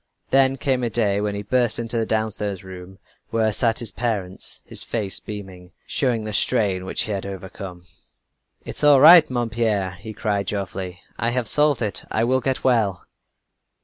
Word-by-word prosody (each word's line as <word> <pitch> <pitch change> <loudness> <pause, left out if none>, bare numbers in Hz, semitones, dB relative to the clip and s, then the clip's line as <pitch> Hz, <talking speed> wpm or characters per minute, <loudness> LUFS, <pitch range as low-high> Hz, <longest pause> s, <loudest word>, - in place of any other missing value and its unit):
Then 135 0 +4
came 130 -2 0
a 120 - 0
day 105 -3 +1
when 105 -1 -2
he 100 - -4
burst 120 +1 +1
in 115 - -3
to 115 - -1
the 110 - -1
downstairs 105 -3 -2
room 95 0 -10 0.3
where 110 -1 +1
sat 115 +1 +2
his 115 -3 -3
parents, 105 -6 -3
his - - -4
face 105 -4 -3
beaming 95 -4 -9
showing 120 -5 0
the 110 0 -5
strain 100 -5 +2
which - - 0
he 110 - -4
had 100 -2 -2
overcome. 95 -2 -8 0.8
"It's - - -5
all 145 -2 +7
right, 160 +3 +9
mon 120 -3 -2
père!" 105 -5 0
he 110 +2 -9
cried 100 -2 -2
joyfully. 95 -2 -4 0.2
"I 115 - +1
have 120 -1 -1
solved 150 -4 +3
it. 105 -3 -3
I 110 - 0
will 130 +2 +2
get 135 0 -2
well!" 110 -8 +1
110 Hz, 180 wpm, -22 LUFS, 95-120 Hz, 0.8 s, right